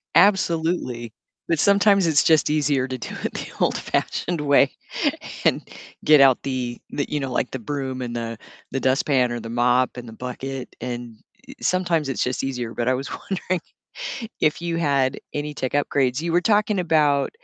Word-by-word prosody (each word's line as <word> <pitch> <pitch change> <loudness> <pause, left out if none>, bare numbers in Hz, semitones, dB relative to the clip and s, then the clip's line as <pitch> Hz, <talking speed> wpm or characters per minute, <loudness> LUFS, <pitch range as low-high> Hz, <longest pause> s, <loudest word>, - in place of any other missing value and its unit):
Absolutely, 165 - +2 0.4
but 165 -2 +2
sometimes 200 0 +4
it's 155 -3 +4
just 160 -2 +4
easier 145 -3 +1
to 130 -1 -4
do 115 - -7
it - - -2
the - - -5
old-fashioned 175 -3 -1
way 140 -1 +4 0.7
and - - +3 0.4
get 150 -2 +7
out 135 -2 +6
the 125 -3 -3
the, 145 - -2
you 150 - -1
know, 135 -2 -3
like 125 - -1
the 130 - -4
broom 130 +1 -4
and 120 -1 -4
the 115 -1 -4 0.3
the 135 - -1
dustpan 130 -1 +2
or 120 - -3
the 115 - -7
mop 125 +2 +2
and 120 -1 -7
the 110 - -9
bucket, 130 +2 -6
and 120 -2 -6 0.3
e - - -9
sometimes 175 -5 +1
it's 135 - -1
just 125 +1 -2
easier, 125 -4 -3
but 120 0 -2
I 130 - +4
was 135 +2 -4
wondering 185 -2 -3 0.8
if 155 +2 +2
you 170 -1 -2
had 140 -4 +1
any 150 0 -3
tech 130 -3 -3
upgrades? 140 -2 +1
You 170 0 -2
were 175 - +4
talking 210 +1 +2
about, 150 -5 +3
135 Hz, 180 wpm, -23 LUFS, 125-160 Hz, 0.8 s, get